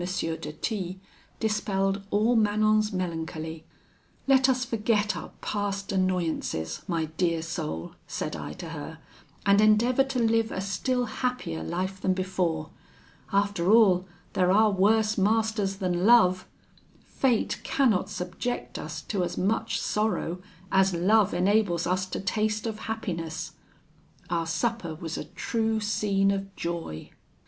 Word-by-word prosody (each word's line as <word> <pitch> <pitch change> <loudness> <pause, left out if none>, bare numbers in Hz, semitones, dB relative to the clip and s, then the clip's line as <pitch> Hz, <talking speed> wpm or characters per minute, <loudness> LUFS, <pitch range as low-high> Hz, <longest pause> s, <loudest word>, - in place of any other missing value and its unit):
de 165 -3 -3
T 190 0 -3 0.4
dispelled 200 -2 0
all 220 +4 +3
Manon's 215 0 +3
melancholy. 160 -3 -4 0.6
'Let 265 -1 +5
us 255 -1 +1
forget 210 -4 +1
our 165 - -6
past 200 -1 -2
annoyances, 170 - -1
my 165 -3 0
dear 170 -3 +1
soul,' 80 - -4
said - - -3
I - - -6
to - - -8
her, - - -7 0.5
'and 200 +1 +5
endeavour 230 +5 +4
to 270 -1 -3
live 225 -1 +2
a - - -3
still 245 +6 -1
happier 240 - -3
life 185 - -3
than 185 -1 +1
before. 180 -4 -1 0.6
After 200 -2 +2
all, 190 -5 +5 0.3
there 180 -1 +3
are 215 +2 +5
worse 210 +2 +3
masters 215 -1 +1
than 180 -2 -1
love: 185 -6 +5 0.6
fate 250 -5 0
cannot 220 -8 +2
subject 195 +5 -4
us 155 0 -6
to 195 -4 -1
as - - -3
much 205 +5 0
sorrow 210 -5 -1 0.3
as 190 -1 +3
love 205 +4 +4
enables 185 -2 +2
us 185 +1 0
to - - -4
taste 215 +2 -1
of 220 -2 -3
happiness.' 170 -8 -4 0.8
Our 165 -1 0
supper 170 0 -1
was 165 0 -5
a - - -4
true 225 -1 -1
scene 200 -2 +1
of 195 0 -4
joy. 170 - -5
195 Hz, 135 wpm, -27 LUFS, 175-220 Hz, 0.8 s, Let